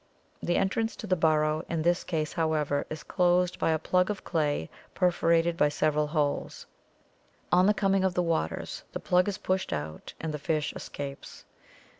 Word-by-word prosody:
The 175 - +1
entrance 225 +4 0
to - - -7
the 185 -3 +2
burrow 155 -1 +2
in 165 -2 -1
this 175 +1 +2
case, 155 -3 -2
however, 155 -3 0
is 155 -1 -6
closed 180 0 +2
by - - +2
a 160 - +3
plug 180 +4 +1
of 210 - -3
clay 150 - 0 0.3
perforated 170 -1 +2
by 150 -3 +3
several 150 +1 +1
holes. 150 -2 -1 0.9
On 180 +2 +5
the 210 - +5
coming 195 -2 +2
of 190 -2 +1
the 180 - +2
waters 160 - -2
the - - -3
plug 180 +1 +2
is 200 - -2
pushed 185 0 -1
out 75 +1 -5
and 160 -1 -3
the 150 - -4
fish 150 0 -1
escapes. 140 -1 -8
165 Hz, 175 wpm, -28 LUFS, 150-180 Hz, 0.9 s, On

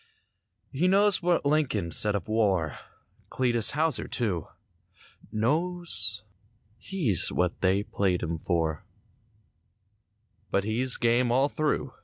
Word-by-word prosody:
He 160 +7 0
knows 200 +1 +4
what 175 -3 +1
Lincoln 135 - 0
said 105 +3 +4
of 100 - -4
war— 100 -8 0 0.5
Cletus 120 -3 +1
Houser, 155 -4 0
too. 95 - -2 0.8
Knows 115 - -1 0.6
he's 150 - +1
what 90 -1 -1
they 95 +2 +2
played 95 -4 -1
him 85 -1 -3
for— 80 -3 -2 1.7
But 100 - 0
he's 120 +5 +1
game 120 +1 +1
all 135 +4 +2
through. 155 0 -2
115 Hz, 110 wpm, -27 LUFS, 95-150 Hz, 1.7 s, knows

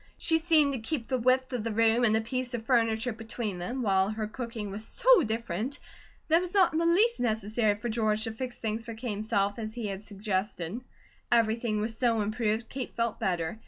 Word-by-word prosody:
She 325 -1 +2
seemed 315 -4 +4
to 260 - -3
keep 235 +2 -3
the 255 0 -1
width 255 +2 +2
of 240 -3 -2
the 230 - -2
room 225 +2 +3
and 220 -2 +4
a - - 0
piece 250 +2 -3
of 225 -1 -6
furniture 230 -1 +2
between 220 -3 -5
them, 245 +9 -3
while 195 -2 +2
her 215 0 -3
cooking 225 -2 -5
was 205 +2 -5
so - - +4
different 225 - -2 0.5
that 320 +1 +5
it - - +2
was 360 +2 -5
not 375 -4 +5
in 315 - +1
the 335 - +2
least 430 +8 +3
necessary 220 -1 +1
for 225 +4 -5
George 220 -1 0
to 225 - -2
fix 245 +2 -5
things 220 0 -3
for 230 -1 -7
Kate 235 +1 -4
himself, 205 0 -1
as 220 0 -5
he 235 -3 -4
had 195 +1 -5
suggested. 200 -1 -3 0.5
Everything 225 -2 +2
was 220 +1 -2
so 230 -2 +2
improved, 215 +1 -1
Kate 260 -1 -6
felt 230 -2 -1
better. 175 +2 -1
225 Hz, 215 wpm, -29 LUFS, 215-250 Hz, 0.5 s, that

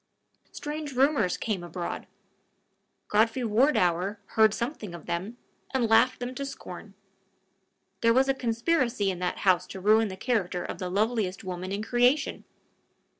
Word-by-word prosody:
Strange 295 -1 -5
rumors 260 -7 +2
came 205 -6 -2
abroad. 175 +1 -5 1.0
Godfrey 225 +4 +2
Wardour 210 - +2
heard 220 -1 +5
something 220 - -4
of 170 - -11
them, 190 +8 -4 0.4
and 245 -3 +2
laughed 235 +3 +4
them 245 +1 -4
to 275 - -4
scorn. 205 -6 -9 1.1
There 230 - +5
was 260 +3 +4
a 270 - +3
conspiracy 235 - 0
in 180 - -6
that 180 0 -2
house 185 -2 +4
to 190 - -8
ruin 215 +3 +4
the 190 -1 -7
character 195 -6 -1
of - - -6
the 180 - -3
loveliest 210 0 0
woman 185 0 -5
in 200 +2 -2
creation! 245 +5 +1
220 Hz, 145 wpm, -27 LUFS, 185-250 Hz, 1.1 s, heard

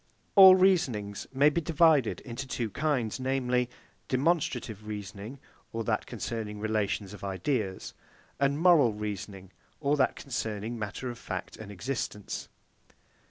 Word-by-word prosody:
All 190 -2 +11
reasonings 160 - +1
may 140 +3 +4
be 170 - 0
divided 155 -5 +3
into 130 +2 -6
two 115 -4 -3
kinds, 135 -4 -1
namely, 125 -2 0 0.4
demonstrative 130 - 0
reasoning, 105 +4 -7 0.3
or 115 0 -3
that 105 -1 -1
concerning 110 -2 -5
relations 105 -2 -1
of 100 - -11
ideas, 95 +1 -2 0.5
and 140 +1 +2
moral 165 -10 +5
reasoning, 100 -2 -6 0.3
or 145 0 +2
that 130 - +2
concerning 115 -3 -4
matter 110 +4 -4
of 120 - -10
fact - - -5
and 105 -2 -9
existence. 105 0 -4
115 Hz, 125 wpm, -29 LUFS, 105-140 Hz, 0.5 s, All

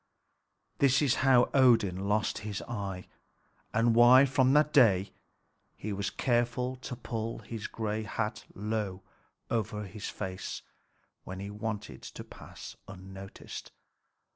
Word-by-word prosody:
This 140 -1 +5
is 135 -3 +3
how 130 -2 +5
Odin 110 -8 +4
lost 105 0 +1
his 105 -1 -5
eye, 100 -5 -5 0.7
and 115 +1 +3
why 120 +3 +8
from 130 0 +3
that 150 +1 +4
day 100 -8 +5 0.7
he 105 0 -4
was 100 0 -2
careful 120 +3 0
to 125 0 -6
pull 115 -2 -4
his 115 -2 -6
gray 110 -1 -3
hat 105 +1 -3
low 105 -2 -3 0.5
over 105 -2 -1
his 100 +1 -6
face 95 -2 -5 0.6
when 95 0 -7
he 100 +1 -5
wanted 105 0 -5
to - - -8
pass - - -11
unnoticed. 95 0 -9
110 Hz, 125 wpm, -30 LUFS, 100-120 Hz, 0.7 s, why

